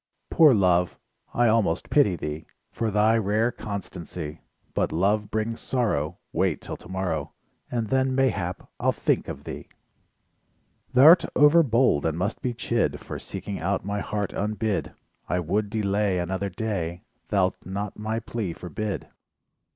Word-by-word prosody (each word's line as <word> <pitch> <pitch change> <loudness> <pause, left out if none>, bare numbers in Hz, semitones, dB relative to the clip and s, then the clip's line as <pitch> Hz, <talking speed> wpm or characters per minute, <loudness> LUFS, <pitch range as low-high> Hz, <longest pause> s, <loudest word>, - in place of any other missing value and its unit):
Poor 155 -3 +7
Love: 90 -3 +2 0.3
I 120 0 +3
almost 110 -7 +1
pity 120 -11 +4
thee 75 -1 -5 0.2
For 115 - -1
thy 110 +2 +3
rare 110 +3 +1
constancy, 85 -7 -6 0.3
But - - 0
Love 105 +4 +1
brings 110 +1 -2
sorrow, 90 - 0 0.2
Wait - - +1
'till - - -6
tomorrow, 90 -6 -3 0.4
And 115 -3 -2
then 130 0 +2
mayhap 105 -10 0
I'll - - +2
think - - 0
of - - -6
thee. - - -7 1.3
Thou'rt 155 +8 +8
overbold 135 - +5
and 80 0 -1
must 100 +5 -2
be 125 -2 -2
chid 115 0 0
For - - -7
seeking 100 - -6
out 95 +2 -1
my 100 0 -2
heart 105 -1 -3
unbid, 105 0 -1 0.4
I 90 - +1
would 100 +5 0
delay 100 -2 +1
Another 95 +3 -2
day, 90 -3 -3 0.2
Thou'lt 95 -3 +1
not 100 +2 -4
my 110 +1 -2
plea 110 -5 -4
forbid? 100 +4 -4
105 Hz, 140 wpm, -26 LUFS, 90-115 Hz, 1.3 s, Thou'rt